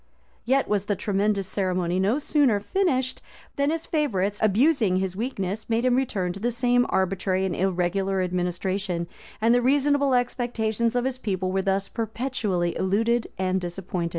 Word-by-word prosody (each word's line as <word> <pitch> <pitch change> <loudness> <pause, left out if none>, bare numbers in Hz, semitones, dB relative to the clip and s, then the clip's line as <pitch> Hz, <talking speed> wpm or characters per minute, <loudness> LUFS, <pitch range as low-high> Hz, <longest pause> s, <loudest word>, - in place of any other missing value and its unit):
[] - - -36
Yet 270 +3 +2
was 205 -1 0
the 205 - 0
tremendous 200 0 0
ceremony 185 -3 -1
no 205 +7 +2
sooner 285 -7 +2
finished, 260 - 0 0.3
than 280 +1 +1
his 325 +1 -2
favorites, 205 - 0
abusing 220 - +3
his 185 -1 -1
weakness, 215 -2 -3
made 230 +2 +1
him 250 -1 +3
return 200 -9 -1
to 195 - -9
the 235 +4 0
same 245 +1 +2
arbitrary 190 0 0
and 180 -3 -2
irregular 190 +1 0
administration; 180 0 -2 0.3
and 225 +2 +3
the 245 - +4
reasonable 280 +1 +3
expectations 235 -2 0
of 245 0 +1
his 260 -1 -2
people 185 -5 -2
were 190 0 +1
thus 195 0 0
perpetually 220 -6 -2
eluded 225 +5 +1
and 185 0 0
disappointed. 175 -1 -3
205 Hz, 160 wpm, -25 LUFS, 190-245 Hz, 0.3 s, the